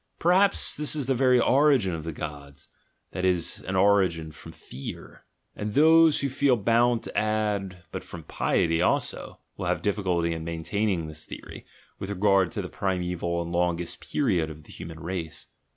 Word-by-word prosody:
Perhaps 190 Hz, +4 st, +3 dB
this 150 Hz, 0 st, -1 dB
is 145 Hz, -3 st, -2 dB
the 135 Hz, -, +1 dB
very 125 Hz, -1 st, +4 dB
origin 130 Hz, -, +3 dB
of 80 Hz, -1 st, -5 dB
the 80 Hz, -, -4 dB
gods, 70 Hz, -2 st, -8 dB, 0.4 s
that 90 Hz, -, -4 dB
is, 90 Hz, -3 st, 0 dB
an 95 Hz, -, -2 dB
origin 95 Hz, -5 st, +2 dB
from -, -, -12 dB
fear/ 65 Hz, +2 st, -10 dB, 0.3 s
And 105 Hz, 0 st, -5 dB
those 160 Hz, +1 st, +6 dB
who 140 Hz, -, 0 dB
feel 135 Hz, -1 st, +2 dB
bound 115 Hz, +2 st, +2 dB
to -, -, -9 dB
add, 105 Hz, -4 st, -1 dB
"but 95 Hz, -, -5 dB
from 80 Hz, -, -10 dB
piety 80 Hz, +2 st, 0 dB
also," -, -, -1 dB, 0.2 s
will -, -, -3 dB
have -, -, -1 dB
difficulty 90 Hz, -5 st, 0 dB
in 80 Hz, -1 st, -5 dB
maintaining 85 Hz, +2 st, -2 dB
this 80 Hz, 0 st, -6 dB
theory, -, -, -10 dB, 0.3 s
with 95 Hz, -, -5 dB
regard 95 Hz, -2 st, +2 dB
to -, -, -3 dB
the -, -, -5 dB
primeval 90 Hz, -2 st, -2 dB
and 85 Hz, -, -7 dB
longest 85 Hz, -1 st, -1 dB
period 95 Hz, -, +1 dB
of 75 Hz, 0 st, -11 dB
the -, -, -16 dB
human 80 Hz, -1 st, -9 dB
race. 85 Hz, -2 st, -5 dB
95 Hz, 170 wpm, -26 LUFS, 85-115 Hz, 0.4 s, those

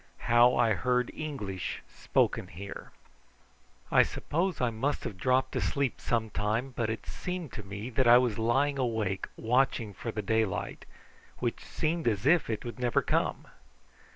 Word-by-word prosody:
HOW 120 Hz, +1 st, +6 dB
I 115 Hz, -2 st, +3 dB
HEARD 125 Hz, +3 st, 0 dB
ENGLISH 105 Hz, -, -5 dB
SPOKEN -, -, 0 dB
HERE. 100 Hz, +4 st, -9 dB, 1.0 s
I -, -, +7 dB
suppose 175 Hz, +4 st, -1 dB
I 125 Hz, -2 st, +1 dB
must 130 Hz, +7 st, -1 dB
have 100 Hz, -, -5 dB
dropped 130 Hz, +6 st, +1 dB
asleep 140 Hz, -4 st, -1 dB
some 110 Hz, -2 st, -1 dB
time, 110 Hz, +6 st, -1 dB
but 115 Hz, -2 st, -1 dB
it 110 Hz, -, -4 dB
seemed 180 Hz, -6 st, -5 dB
to -, -, -5 dB
me 100 Hz, +5 st, -6 dB
that 125 Hz, +1 st, +2 dB
I 120 Hz, +1 st, +9 dB
was 120 Hz, -4 st, +1 dB
lying 135 Hz, +5 st, +2 dB
awake 110 Hz, -6 st, -1 dB
watching 115 Hz, -2 st, +1 dB
for 115 Hz, +5 st, -5 dB
the 105 Hz, -1 st, -4 dB
daylight, 110 Hz, -2 st, -1 dB, 0.5 s
which -, -, -2 dB
seemed 165 Hz, 0 st, -2 dB
as 105 Hz, -1 st, 0 dB
if 160 Hz, -1 st, +4 dB
it 110 Hz, 0 st, -3 dB
would 120 Hz, +1 st, -6 dB
never 120 Hz, -2 st, +2 dB
come. -, -, 0 dB
120 Hz, 155 wpm, -29 LUFS, 110-130 Hz, 1.0 s, I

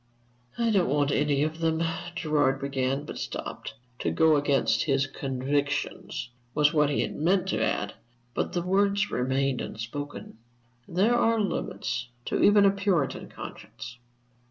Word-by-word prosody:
"I 235 Hz, -1 st, +2 dB
don't 190 Hz, -8 st, +3 dB
want 145 Hz, 0 st, +2 dB
any 145 Hz, 0 st, +2 dB
of 155 Hz, +1 st, -2 dB
them" 165 Hz, 0 st, +1 dB, 0.3 s
Gerard 145 Hz, -4 st, +1 dB
began, 135 Hz, +1 st, -1 dB
but -, -, -7 dB
stopped. -, -, -5 dB, 0.2 s
"To -, -, 0 dB
go 160 Hz, -1 st, +4 dB
against 140 Hz, -6 st, +2 dB
his 135 Hz, -2 st, +2 dB
convictions," 140 Hz, +1 st, -2 dB, 0.3 s
was 150 Hz, 0 st, +4 dB
what 150 Hz, -2 st, +3 dB
he 145 Hz, -, +1 dB
had -, -, -3 dB
meant 180 Hz, +4 st, +2 dB
to -, -, +1 dB
add, 105 Hz, 0 st, -1 dB, 0.4 s
but -, -, -2 dB
the 175 Hz, -, 0 dB
words 200 Hz, +2 st, +2 dB
remained 130 Hz, +1 st, 0 dB
unspoken. 115 Hz, +2 st, -6 dB, 0.5 s
There 195 Hz, +7 st, +2 dB
are 230 Hz, -1 st, +3 dB
limits 200 Hz, -, -2 dB, 0.2 s
to -, -, -1 dB
even 205 Hz, 0 st, +6 dB
a 195 Hz, -, +6 dB
Puritan 195 Hz, -7 st, 0 dB
conscience. 125 Hz, +1 st, -9 dB
145 Hz, 145 wpm, -27 LUFS, 135-180 Hz, 0.5 s, even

